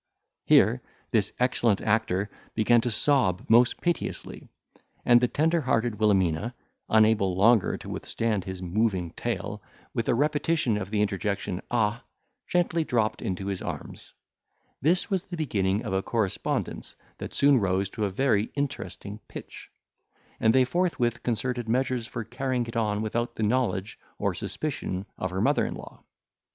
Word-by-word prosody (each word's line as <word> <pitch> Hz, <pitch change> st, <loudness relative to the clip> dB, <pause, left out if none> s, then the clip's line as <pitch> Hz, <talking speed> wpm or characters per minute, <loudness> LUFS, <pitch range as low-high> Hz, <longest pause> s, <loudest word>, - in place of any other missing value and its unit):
Here -, -, +5 dB, 0.3 s
this -, -, +2 dB
excellent 120 Hz, -4 st, +2 dB
actor 100 Hz, -3 st, +1 dB, 0.3 s
began 115 Hz, +1 st, +4 dB
to 120 Hz, -, -1 dB
sob 115 Hz, -, +2 dB
most 120 Hz, +1 st, +5 dB
piteously, 175 Hz, -2 st, -3 dB, 0.6 s
and 120 Hz, 0 st, +6 dB
the 125 Hz, -, +3 dB
tender 160 Hz, +5 st, +1 dB
hearted 115 Hz, -4 st, 0 dB
Wilhelmina, 100 Hz, +1 st, +2 dB, 0.3 s
unable 110 Hz, -4 st, +4 dB
longer 105 Hz, +3 st, +4 dB
to -, -, -11 dB
withstand 110 Hz, -4 st, -1 dB
his 95 Hz, 0 st, -6 dB
moving 90 Hz, -2 st, 0 dB
tale, -, -, -4 dB, 0.3 s
with 115 Hz, -, -1 dB
a 120 Hz, -, +4 dB
repetition 150 Hz, -2 st, +1 dB
of 95 Hz, -2 st, -3 dB
the 105 Hz, 0 st, +1 dB
interjection, 100 Hz, -2 st, -2 dB
ah! 115 Hz, +1 st, 0 dB, 0.4 s
gently 170 Hz, -2 st, +1 dB
dropped 115 Hz, -7 st, 0 dB
into 95 Hz, 0 st, -3 dB
his 100 Hz, -2 st, -3 dB
arms. -, -, -7 dB, 0.7 s
This 175 Hz, -, +2 dB
was 190 Hz, -1 st, 0 dB
the 175 Hz, -2 st, -7 dB
beginning 100 Hz, -9 st, 0 dB
of -, -, -3 dB
a 95 Hz, -, +1 dB
correspondence 110 Hz, -3 st, -2 dB, 0.2 s
that -, -, -6 dB
soon 140 Hz, -2 st, +5 dB
rose 95 Hz, -1 st, +1 dB
to 110 Hz, -3 st, -2 dB
a -, -, 0 dB
very 105 Hz, 0 st, +2 dB
interesting 135 Hz, -7 st, -4 dB
pitch; -, -, -10 dB, 0.7 s
and 110 Hz, -, +4 dB
they 130 Hz, +2 st, +5 dB
forthwith 125 Hz, -5 st, 0 dB
concerted 120 Hz, 0 st, -2 dB
measures 125 Hz, -1 st, 0 dB
for 115 Hz, -, -5 dB
carrying 125 Hz, +1 st, -2 dB
it 115 Hz, +1 st, -8 dB
on 105 Hz, -2 st, 0 dB
without 120 Hz, +2 st, -2 dB
the 110 Hz, -, -2 dB
knowledge 110 Hz, -3 st, 0 dB, 0.2 s
or -, -, 0 dB
suspicion 95 Hz, +2 st, -4 dB
of 95 Hz, -, -1 dB
her 95 Hz, +2 st, -2 dB
mother -, -, +3 dB
in -, -, -3 dB
law. -, -, -11 dB
115 Hz, 150 wpm, -27 LUFS, 100-125 Hz, 0.7 s, and